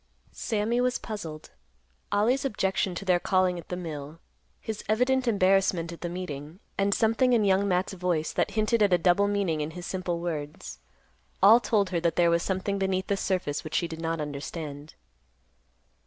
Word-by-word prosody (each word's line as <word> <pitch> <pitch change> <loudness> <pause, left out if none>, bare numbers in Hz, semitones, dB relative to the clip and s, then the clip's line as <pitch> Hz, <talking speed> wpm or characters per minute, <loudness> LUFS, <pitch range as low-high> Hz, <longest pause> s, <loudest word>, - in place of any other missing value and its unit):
Sammy 225 +2 -1
was 250 0 +1
puzzled. 165 -9 -7 0.6
Ollie's 225 +7 +2
objection 190 -6 0
to 195 - -6
their 180 -2 +3
calling 185 -1 +1
at - - -13
the 180 - -2
mill, 155 -3 -7 0.4
his 220 -2 -5
evident 250 +3 +2
embarrassment 190 -5 +2
at 170 - -10
the 175 - -3
meeting, 170 -2 -6 0.2
and 200 0 +1
something 225 +4 +3
in 220 -3 +3
Young 195 +1 +3
Matt's 185 +1 0
voice 175 -4 -1
that - - +1
hinted 215 +1 +2
at 200 -3 +4
a - - +6
double 180 +4 +3
meaning 195 -6 0
in 150 - -2
his 175 +2 -8
simple 185 -3 -3
words, 155 -3 -5 0.6
all 220 +4 +9
told 205 -6 +1
her 175 - +1
that 170 0 0
there 170 -1 +4
was 170 0 +2
something 195 +2 -2
beneath 190 0 0
the 200 - 0
surface 185 -7 -2
which 155 - -6
she 170 - +1
did 165 0 -7
not 165 0 -2
understand. 145 0 -6
185 Hz, 180 wpm, -27 LUFS, 165-205 Hz, 0.6 s, all